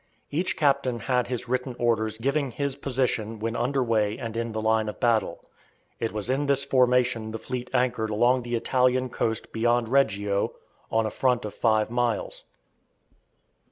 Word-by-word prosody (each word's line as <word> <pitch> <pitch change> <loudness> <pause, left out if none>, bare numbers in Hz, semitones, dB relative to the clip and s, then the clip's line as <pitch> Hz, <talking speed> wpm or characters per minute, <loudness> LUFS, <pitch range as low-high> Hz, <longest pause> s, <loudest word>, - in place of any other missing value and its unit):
Each 170 +6 -1
captain 135 -4 +2
had 125 -2 +1
his 125 -1 -3
written 125 0 -2
orders 110 -2 0
giving 140 +4 0
his 140 +2 -3
position 125 -5 -1
when 115 +2 -3
under 130 +3 0
way 110 -3 +1
and 115 -1 -6
in 115 0 -2
the 110 - -3
line 110 0 +1
of - - -8
battle. 115 -2 +1 0.5
It 115 - -1
was 105 -1 -4
in 135 +3 0
this 140 0 +2
formation 125 -4 +2
the 110 - -4
fleet 125 +2 -5
anchored 120 -3 +1
along 120 +4 +3
the 120 0 -3
Italian 125 +1 +1
coast 110 -1 -2
beyond 120 0 +1
Reggio, 105 -7 +1 0.4
on 110 0 +2
a 110 - -2
front 125 0 +1
of 105 - -5
five 110 -1 +1
miles. 120 -3 -1
120 Hz, 165 wpm, -26 LUFS, 110-130 Hz, 0.5 s, along